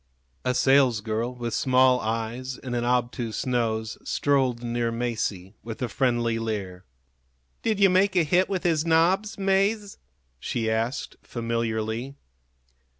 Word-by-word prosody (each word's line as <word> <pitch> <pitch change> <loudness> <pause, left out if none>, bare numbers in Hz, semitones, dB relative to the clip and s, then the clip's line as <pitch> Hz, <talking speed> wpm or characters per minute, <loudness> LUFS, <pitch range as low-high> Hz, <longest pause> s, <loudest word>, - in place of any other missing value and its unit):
A 125 0 0
salesgirl, 120 -4 +2
with 120 -1 -4
small 130 -1 +4
eyes 115 +3 -3
and 125 -2 -5
an 120 - 0
obtuse 120 -2 -1
nose, 110 -3 -1
strolled 130 -4 +1
near 120 0 -1
Masie, 110 -5 -3
with 115 -1 -7
a - - 0
friendly 120 -2 0
leer. 100 -5 -4 0.8
"Did 220 -3 0
you 195 -2 +6
make 190 +1 +3
a 175 - +4
hit 180 +4 +2
with 190 -3 -2
his 165 -4 +2
nobs, 180 +6 +2
Mase?" 200 +2 0 0.4
she 110 - -2
asked, 115 +4 -2
familiarly. 115 +2 -3
120 Hz, 130 wpm, -25 LUFS, 115-145 Hz, 0.8 s, you